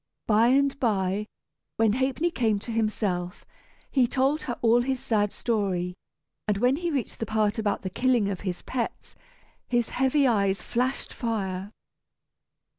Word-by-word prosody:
By 220 +2 +4
and 275 +2 +3
by, 205 -3 0 0.5
when 220 -2 +3
Ha'penny 270 +7 0
came 225 -8 +1
to 235 - -6
himself, 205 -5 -1 0.5
he 260 -4 +4
told 275 +5 +1
her 240 - -4
all 235 +1 +5
his 260 +1 -1
sad 210 -4 +1
story, 190 -6 -1 0.5
and 210 -2 +1
when 250 +6 +3
he 345 +1 -2
reached 275 -7 -3
the 225 - -3
part 215 0 +1
about 210 -2 -1
the 190 - -2
killing 245 -1 +2
of 195 -3 -3
his 185 -3 -4
pets, 245 -3 -4 0.5
his 240 -2 +1
heavy 265 +2 +2
eyes 200 -5 +2
flashed 250 +3 -2
fire. 200 -4 -3
225 Hz, 150 wpm, -26 LUFS, 205-255 Hz, 0.5 s, all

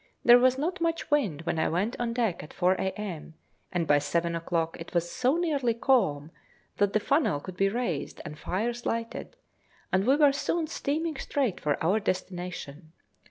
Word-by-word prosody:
There 245 0 +9
was 255 +1 +4
not 340 +6 -2
much 330 -2 -1
wind 205 - +1
when 165 - -1
I - - +2
went 195 +8 0
on 240 -1 -1
deck 230 -7 0
at 150 - -12
4 180 0 +3
a.m., 190 -5 -4 0.4
and 175 -2 0
by 145 -1 +4
seven 170 +3 -1
o'clock 165 0 -1
it 165 +2 -9
was 170 0 +1
so 255 +4 +2
nearly 285 -9 +1
calm, 160 - +2 0.5
that 205 -1 +2
the 215 - +3
funnel 275 - +1
could 185 +4 -9
be 195 +1 +2
raised 215 - -3
and 150 - -6
fires 235 +9 -3
lighted, 230 - -3 0.6
and 190 +3 +2
we 270 - +6
were 290 -2 +5
soon 320 +3 -1
steaming 310 0 -2
straight 265 -8 -1
for 145 -1 0
our 190 +7 +3
destination. 180 -5 -4
205 Hz, 180 wpm, -28 LUFS, 170-260 Hz, 0.6 s, There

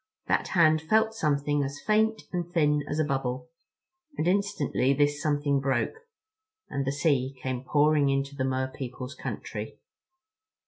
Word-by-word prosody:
That - - +1
hand 155 -2 +5
felt 220 +7 +2
something 145 -6 0
as 140 +1 -5
faint 220 +1 +1
and 175 -1 -3
thin 150 -4 +2
as 150 - -2
a 155 - +3
bubble—and 165 - -5
instantly 180 -9 +1
this 145 +1 +1
something 145 -2 +1
broke, 135 - -1 0.7
and 140 -1 -1
the - - +2
sea 140 -2 +1
came 130 -1 -3
pouring 145 +1 +3
into 135 +1 -1
the 130 - -1
Mer 130 0 -1
people's 130 0 -6
country. - - -6
145 Hz, 140 wpm, -27 LUFS, 135-165 Hz, 0.7 s, hand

